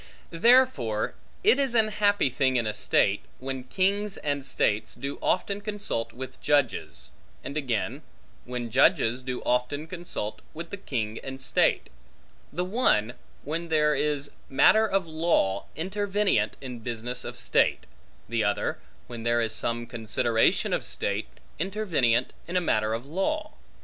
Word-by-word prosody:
Therefore 165 - +3 0.3
it 420 -5 +5
is 270 -4 0
an 220 -2 +4
happy 205 -8 +2
thing 130 0 +1
in 120 -2 +2
a 110 - -1
state, - - +2 0.2
when 130 -1 -5
kings 200 +2 0
and 145 -1 -2
states 105 -5 0
do 140 +3 -5
often 200 +2 0
consult 205 - -3
with 130 +2 -8
judges; 145 -5 0 0.3
and 140 - -6
again, 130 -8 -1 0.4
when 120 -2 -4
judges 115 +3 +4
do 130 -1 -4
often 125 +5 0
consult 170 - -5
with 165 +1 -7
the - - -2
king 115 - -3
and 135 0 -6
state: 130 - +1 0.6
the 180 +4 -2
one, 180 - +2 0.3
when 165 +3 -3
there 150 -1 +3
is 145 0 -1 0.2
matter 220 +11 +5
of 195 -3 +1
law, 155 - +1
intervenient 195 - +1
in 125 -3 -6
business 120 +2 -4
of - - -6
state; - - +2 0.4
the 115 -1 0
other, 105 0 0 0.3
when 120 -1 -8
there 120 +1 +2
is 115 -1 0
some 120 +1 -2
consideration 115 0 +1
of - - 0
state, - - -2 0.3
intervenient 160 - +1 0.2
in 180 0 0
matter 110 -3 +1
of 115 +3 -6
law. 195 - -2
140 Hz, 145 wpm, -27 LUFS, 120-185 Hz, 0.6 s, it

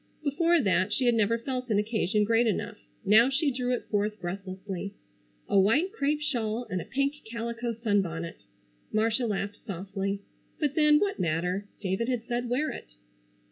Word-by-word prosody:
Before 335 +4 +3
that 190 - +2
she 255 - 0
had 240 - +5
never 225 0 +2
felt 250 +1 -4
an 210 - +3
occasion 210 -1 +1
great 230 +2 +3
enough. 210 - -2 0.3
Now 225 +5 +6
she 280 +2 +1
drew 250 -1 -1
it 250 - -1
forth 210 0 0
breathlessly. 190 +2 -5 0.5
A 200 - +4
white 270 - +3
crêpe 295 -7 0
shawl 240 -5 -1
and 185 -1 -1
a - - -8
pink 275 +2 0
calico 235 0 -3
sunbonnet! 190 -7 -1 0.5
Marcia 225 +3 +1
laughed 205 -1 -2
softly. 195 +1 -3 0.4
But 295 -4 +1
then, 300 -1 +5
what 400 -1 0
matter! 180 +4 0
David 195 +5 -1
had 245 -3 -1
said 240 0 -2
wear 270 +6 +1
it. - - -10
225 Hz, 165 wpm, -28 LUFS, 195-255 Hz, 0.5 s, Now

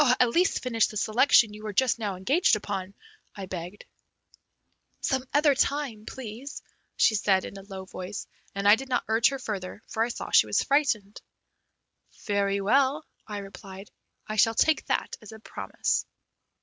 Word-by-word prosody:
"At 250 - +5
least 360 +10 +1
finish 230 -3 +2
the 215 - -7
selection 220 0 +4
you 210 - -10
were 215 -1 -5
just 250 +2 +2
now 205 -3 -2
engaged 265 - +3
upon," 200 -2 -5 0.4
I 195 - -6
begged. 180 +1 -7 1.2
"Some 265 -1 0
other 290 0 +4
time, 265 -6 -1
please," 255 +3 -8 0.3
she - - +4
said 195 -3 +2
in - - -8
a 195 - -8
low 190 -1 -9
voice; 185 +2 -7 0.3
and 200 0 0
I 205 - +9
did 265 +3 -8
not 250 - +1
urge 225 +2 +4
her 275 - -4
further, 205 -4 -6
for 220 - -3
I 235 - -1
saw 240 - -6
she - - +6
was - - +1
frightened. 245 -8 0 1.0
"Very 200 -1 0
well," 275 +8 +2 0.2
I 210 -1 -5
replied, 195 0 -10 0.3
"I 215 - -5
shall 225 +2 +4
take 315 +5 +2
that - - -1
as 215 0 -11
a - - -9
promise." - - -2
215 Hz, 170 wpm, -27 LUFS, 200-255 Hz, 1.2 s, I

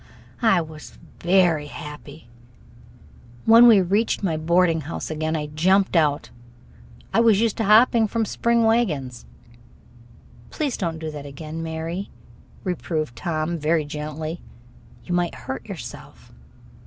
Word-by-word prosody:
I 195 -7 +4
was 155 -2 -11 0.2
very 175 -4 +2
happy. 150 -1 -10 1.2
When 230 +2 +8
we 215 -5 +7
reached 205 +5 0
my 170 -5 0
boarding 165 +1 +2
house 160 +2 -6
again, 155 +1 -2
I 150 -1 -2
jumped 185 +7 +2
out. 150 -3 +1 0.8
I - - +3
was 225 -4 +4
used 225 -2 +1
to 225 - -1
hopping 225 +2 +5
from 225 +1 -1
spring 235 +2 +1
wagons. 155 - 0 1.2
"Please 290 -5 -2
don't 165 -4 -3
do 160 -1 -5
that 145 -1 -8
again, 155 +3 -7
Mary," 165 +4 -5 0.5
reproved 160 -7 -3
Tom, 160 +3 -2
very 155 +1 +1
gently. 155 +2 -6 0.6
"You 180 - -3
might 175 -1 0
hurt 130 - -7
yourself." - - -10
165 Hz, 130 wpm, -23 LUFS, 155-200 Hz, 1.2 s, When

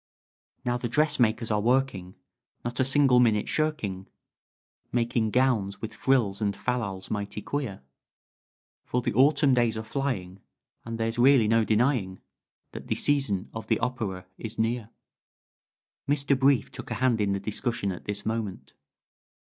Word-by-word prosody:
"Now 120 0 +1
the 120 -1 -4
dressmakers 120 -6 +2
are 105 -1 +1
working 120 -6 0 0.5
Not 120 +2 -3
a - - +4
single 135 -1 +4
minute 110 -4 +3
shirking 110 -12 -2 0.8
Making 115 -2 +1
gowns 110 -5 +1
with 110 -1 -6
frills 110 -6 +1
and 100 -2 0
fal 125 +3 -1
lals 95 -4 -6
mighty 100 0 -3
queer, 125 - -4 1.0
For 125 0 -2
the - - -1
Autumn 140 +3 +4
days 120 -3 +2
are 110 - -4
flying, 110 -7 -3 0.5
And 115 0 -5
there's 115 +1 -2
really 125 -3 +6
no 115 +1 +3
denying 110 -4 +1 0.5
That - - -9
the - - 0
season 115 -9 0
of 110 - -7
the 110 - +2
opera 105 -7 -3
is 110 0 -5
near." 115 0 -1 1.2
Mr. 140 -1 +2
Brief 135 -2 +2
took - - -8
a - - -2
hand 125 -4 +2
in 100 -1 +1
the 100 - -1
discussion 105 0 -2
at 90 - -8
this 105 0 -4
moment. 110 -4 -4
115 Hz, 150 wpm, -27 LUFS, 105-130 Hz, 1.2 s, really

